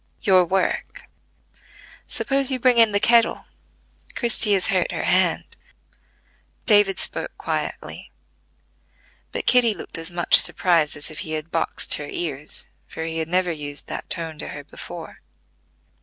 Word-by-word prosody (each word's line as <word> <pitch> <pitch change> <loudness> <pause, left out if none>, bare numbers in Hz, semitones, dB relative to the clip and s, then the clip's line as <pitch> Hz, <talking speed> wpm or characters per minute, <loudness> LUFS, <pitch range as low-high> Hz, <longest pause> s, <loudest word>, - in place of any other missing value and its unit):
"Your 185 -2 +5
work. 190 +1 -2 1.0
Suppose 275 -1 0
you 260 -2 -1
bring 250 -1 +3
in 225 -2 +6
the 205 - +2
kettle: 230 +1 +3 0.7
Christie 230 -3 +3
has 190 -2 +2
hurt - - +1
her - - -4
hand." - - +2 1.2
David 205 -3 +4
spoke - - -1
quietly; - - -5 1.2
but - - -4
Kitty 240 -4 +4
looked 165 - -6
as 165 +1 -5
much 175 0 +4
surprised 165 -5 +3
as 145 - -6
if 155 - -9
he 155 - -5
had 155 +1 -5
boxed 165 - -2
her 145 - -7
ears, 150 -4 -2 0.2
for 160 - -7
he 165 0 -3
had 160 - -2
never 180 +1 0
used 145 -2 -5
that - - -6
tone 165 -3 -4
to - - -6
her 145 - -8
before. 145 - -10
175 Hz, 145 wpm, -22 LUFS, 155-215 Hz, 1.2 s, in